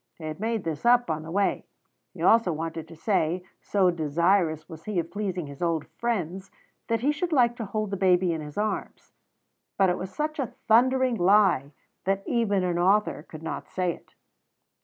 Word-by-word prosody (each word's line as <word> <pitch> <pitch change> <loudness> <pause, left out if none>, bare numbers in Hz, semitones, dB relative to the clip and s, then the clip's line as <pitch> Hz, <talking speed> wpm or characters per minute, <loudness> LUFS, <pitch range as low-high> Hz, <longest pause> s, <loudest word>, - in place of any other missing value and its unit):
He 165 - -13
had 155 +1 -5
made 225 0 -1
this 160 -3 -4
up 240 -5 +4
on 155 0 -2
the 160 - -9
way. 195 +3 0 0.5
He - - -6
also 225 -5 +5
wanted 160 0 -4
to 165 - -12
say, 175 0 0 0.2
so 190 -3 +2
desirous 165 +1 +1
was 160 -2 -11
he 210 -3 -3
of 165 -1 -1
pleasing 190 -5 -3
his 140 +1 -11
old 165 -3 0
friends, 190 -5 -2 0.4
that 230 -1 0
he 280 +4 +3
should 335 +4 -3
like 240 -5 +3
to 230 - -4
hold 215 0 -3
the 200 - -2
baby 180 -2 +3
in 160 - -4
his 150 -1 -9
arms; 210 +1 -3 0.6
but 190 -2 +4
it 180 - -2
was 185 - -5
such 305 +6 -3
a 260 -5 -3
thundering 255 +2 +4
lie 185 -7 +4 0.3
that 195 +1 0
even 205 -6 +1
an 175 -1 0
author 195 -1 +2
could 155 +1 -12
not - - -5
say 180 -2 -1
it. - - -18
185 Hz, 195 wpm, -26 LUFS, 165-220 Hz, 0.6 s, also